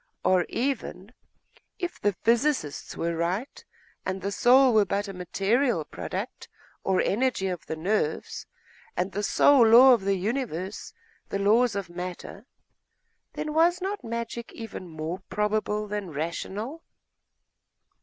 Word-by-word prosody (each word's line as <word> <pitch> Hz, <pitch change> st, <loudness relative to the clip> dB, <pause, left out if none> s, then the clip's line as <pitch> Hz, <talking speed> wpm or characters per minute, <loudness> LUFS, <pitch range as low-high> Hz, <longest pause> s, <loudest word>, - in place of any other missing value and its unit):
Or 185 Hz, -2 st, +3 dB
even, 235 Hz, -5 st, -3 dB, 0.6 s
if 350 Hz, -2 st, -5 dB
the 205 Hz, 0 st, +2 dB
physicists 235 Hz, -, 0 dB
were 170 Hz, 0 st, -1 dB
right, 180 Hz, -, -3 dB, 0.4 s
and 185 Hz, +1 st, -3 dB
the 200 Hz, +1 st, -3 dB
soul 250 Hz, +4 st, +5 dB
were 215 Hz, -1 st, +6 dB
but 200 Hz, +1 st, -2 dB
a 195 Hz, -, -6 dB
material 195 Hz, +8 st, 0 dB
product -, -, -6 dB, 0.3 s
or 190 Hz, -1 st, +1 dB
energy 235 Hz, -1 st, +1 dB
of 180 Hz, -3 st, -6 dB
the 160 Hz, -, -3 dB
nerves, 160 Hz, -1 st, -2 dB, 0.5 s
and 185 Hz, +2 st, 0 dB
the 205 Hz, -, -2 dB
sole 265 Hz, +5 st, +5 dB
law 250 Hz, +4 st, +9 dB
of 235 Hz, -, +2 dB
the 195 Hz, 0 st, +1 dB
universe 200 Hz, -, -3 dB, 0.4 s
the -, -, -1 dB
laws 215 Hz, +3 st, +3 dB
of 200 Hz, -2 st, -3 dB
matter, 180 Hz, +5 st, -7 dB, 0.9 s
then 305 Hz, -, -4 dB
was 340 Hz, +3 st, +4 dB
not 390 Hz, -2 st, -4 dB
magic 235 Hz, 0 st, -5 dB
even 225 Hz, -5 st, -8 dB
more 160 Hz, +2 st, -5 dB
probable, 210 Hz, 0 st, -1 dB
more 210 Hz, 0 st, -2 dB
rational? 195 Hz, -, -4 dB
210 Hz, 135 wpm, -27 LUFS, 185-245 Hz, 0.9 s, law